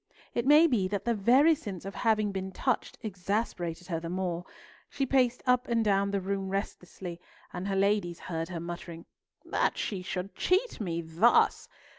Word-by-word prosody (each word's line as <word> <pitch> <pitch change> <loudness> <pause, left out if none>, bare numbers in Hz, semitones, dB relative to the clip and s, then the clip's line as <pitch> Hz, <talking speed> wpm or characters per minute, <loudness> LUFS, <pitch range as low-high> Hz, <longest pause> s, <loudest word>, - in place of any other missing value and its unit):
It 235 +2 -1
may 300 +3 +8
be 235 - +2
that 200 0 -3
the 235 - +2
very 255 +10 +5
sense 205 - -6
of 195 - -5
having 215 -2 +1
been 190 0 -4
touched 255 +6 -1
exasperated 180 -4 -3
her 165 -2 -1
the 165 0 -6
more. 180 -1 -2 0.4
She 275 - -1
paced 250 -2 +2
up 250 0 +3
and 230 -2 +1
down 200 -1 +2
the 200 0 0
room 195 0 -3
restlessly, 180 -3 -5 0.3
and 180 +2 -4
her 195 - -1
ladies 195 -3 +1
heard 165 -1 -4
her 175 -2 -4
muttering—"That 170 0 -4
she 195 -4 -2
should 180 +1 -4
cheat 375 - 0
me 170 -4 -2
thus! 165 +9 +3
195 Hz, 170 wpm, -29 LUFS, 180-235 Hz, 0.4 s, may